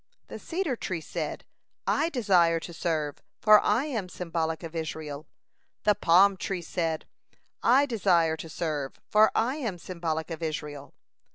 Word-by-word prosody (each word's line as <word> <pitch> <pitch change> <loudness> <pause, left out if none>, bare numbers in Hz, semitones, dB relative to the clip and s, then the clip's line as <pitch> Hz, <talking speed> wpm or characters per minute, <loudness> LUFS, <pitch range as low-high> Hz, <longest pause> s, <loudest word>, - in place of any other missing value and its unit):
The - - -7
cedar 335 -6 -2
tree 185 -6 -3
said: 160 - -5 0.4
"I 325 - +2
desire 180 - +3
to 170 - -8
serve, 155 -3 -2 0.2
for 215 -1 +7
I 225 +7 +2
am 225 -11 -3
symbolic 165 -2 -3
of 165 0 -7
Israel." 155 -2 -5 0.6
The 210 - +5
palm 190 +1 +5
tree 185 -2 -3
said: 165 -2 -2 0.6
"I 265 +4 +5
desire 180 - +2
to 165 - -8
serve, 155 -4 -3 0.2
for 215 +1 +6
I 255 +6 +1
am 225 -11 -3
symbolic 165 -2 -4
of 165 0 -5
Israel." 150 -3 -5
170 Hz, 150 wpm, -28 LUFS, 160-210 Hz, 0.6 s, for